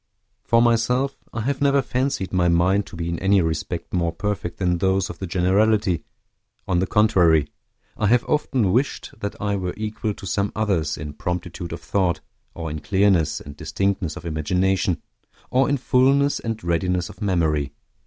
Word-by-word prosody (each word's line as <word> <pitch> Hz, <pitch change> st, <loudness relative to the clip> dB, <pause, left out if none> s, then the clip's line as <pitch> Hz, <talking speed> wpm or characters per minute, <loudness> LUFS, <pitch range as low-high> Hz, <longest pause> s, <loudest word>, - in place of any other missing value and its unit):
For 115 Hz, 0 st, +4 dB
myself, 125 Hz, +3 st, +2 dB, 0.2 s
I 120 Hz, -, -3 dB
have 135 Hz, +4 st, -2 dB
never 140 Hz, 0 st, +4 dB
fancied 125 Hz, -6 st, -1 dB
my 90 Hz, -1 st, +3 dB
mind 90 Hz, +4 st, +2 dB
to -, -, -11 dB
be 85 Hz, 0 st, -4 dB
in 85 Hz, -1 st, -2 dB
any 95 Hz, +1 st, +3 dB
respect 80 Hz, -3 st, -2 dB
more 85 Hz, -2 st, +1 dB
perfect 95 Hz, 0 st, -3 dB
than 90 Hz, -2 st, 0 dB
those 95 Hz, +1 st, +1 dB
of -, -, -12 dB
the 95 Hz, -, -4 dB
generality; 95 Hz, 0 st, +2 dB, 0.6 s
on 90 Hz, -2 st, +2 dB
the 95 Hz, -, 0 dB
contrary, 85 Hz, -9 st, +4 dB, 0.5 s
I 105 Hz, -, 0 dB
have 120 Hz, +3 st, +4 dB
often 130 Hz, -9 st, +1 dB
wished 130 Hz, +7 st, 0 dB
that 100 Hz, -1 st, -5 dB
I 100 Hz, -1 st, 0 dB
were 90 Hz, -2 st, -3 dB
equal 105 Hz, -1 st, -3 dB
to -, -, -10 dB
some 100 Hz, +2 st, -1 dB
others 95 Hz, -9 st, 0 dB
in 75 Hz, -1 st, -6 dB
promptitude 90 Hz, +1 st, -4 dB
of -, -, -6 dB
thought, 90 Hz, -5 st, 0 dB, 0.4 s
or 80 Hz, -2 st, -4 dB
in 75 Hz, -, -4 dB
clearness 95 Hz, +1 st, +2 dB
and 70 Hz, 0 st, -10 dB
distinctness 95 Hz, -1 st, -2 dB
of 80 Hz, -, -9 dB
imagination, 90 Hz, +4 st, 0 dB, 0.5 s
or 130 Hz, +2 st, +3 dB
in 145 Hz, -, +2 dB
fullness 135 Hz, +2 st, +3 dB
and 115 Hz, -1 st, -4 dB
readiness 90 Hz, +1 st, 0 dB
of -, -, -14 dB
memory. 80 Hz, -8 st, +1 dB
95 Hz, 175 wpm, -23 LUFS, 85-110 Hz, 0.6 s, For